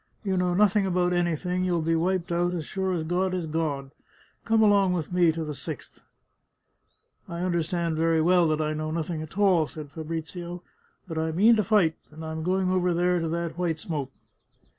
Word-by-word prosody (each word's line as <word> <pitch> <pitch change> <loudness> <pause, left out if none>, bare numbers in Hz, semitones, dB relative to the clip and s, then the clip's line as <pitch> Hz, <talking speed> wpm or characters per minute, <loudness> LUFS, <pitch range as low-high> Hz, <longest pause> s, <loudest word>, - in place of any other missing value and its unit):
You 195 -2 0
know 180 -1 +1
nothing 205 0 +3
about 180 -1 +1
anything; 175 +1 0
you'll 175 -3 0
be 165 +1 +1
wiped 180 +2 0
out, 175 +1 +1
as 160 -3 -4
sure 190 +3 -2
as 165 -3 -1
God 180 +3 0
is 180 -2 -2
God; 150 -4 -2 0.5
come 225 -1 +3
along 200 -3 +4
with 175 -1 -3
me 175 -2 +4
to 160 0 -4
the 150 -1 -4
Sixth! - - -7 0.5
" - - -49
" - - -37
I 170 0 -4
understand 170 -2 -1
very 165 0 +2
well 175 +1 +4
that 155 0 0
I 155 0 -1
know 155 0 -3
nothing 160 0 -3
at 155 +4 -9
all," 185 -6 +4
said 150 -2 -9
Fabrizio; 165 +3 -6 0.2
" - - -39
but 160 -2 -3
I 160 0 -1
mean 210 +8 +5
to 215 - +2
fight, 185 -5 +3
and 160 +1 -9
I 160 - -5
am 160 0 -4
going 185 +2 +1
over 180 -1 +1
there 180 +1 +2
to 165 - -2
that 170 0 -3
white 170 -3 0
smoke." 155 -5 -4
170 Hz, 210 wpm, -26 LUFS, 160-180 Hz, 0.5 s, mean